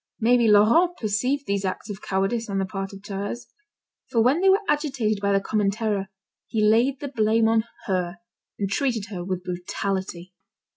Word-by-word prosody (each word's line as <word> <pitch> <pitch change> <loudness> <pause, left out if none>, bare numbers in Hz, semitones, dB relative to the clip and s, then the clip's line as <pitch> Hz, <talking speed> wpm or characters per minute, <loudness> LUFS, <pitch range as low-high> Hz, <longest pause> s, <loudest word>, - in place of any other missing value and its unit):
Maybe 235 0 +4
Laurent 235 - +5
perceived 250 +7 -1
these 200 -2 -1
acts 190 +2 -3
of 205 -1 -7
cowardice 200 +4 -1
on 195 - -2
the 195 - 0
part 195 0 -5
of 195 -1 -11
Thérèse, 205 +3 -5 0.6
for 230 - +1
when 270 +8 +3
they 385 - +5
were 390 +2 +4
agitated 265 -9 0
by 200 0 +1
the 195 - +4
common 205 0 0
terror, 205 -2 -1 0.4
he 215 -2 +1
laid 240 +5 +3
the 285 - -3
blame 225 -3 +2
on 225 0 +2 0.2
her, 180 -1 -1 0.4
and 200 - -1
treated 225 -1 -1
her 180 -3 -4
with 185 0 -3
brutality. 185 0 -4
210 Hz, 180 wpm, -24 LUFS, 195-235 Hz, 0.6 s, Laurent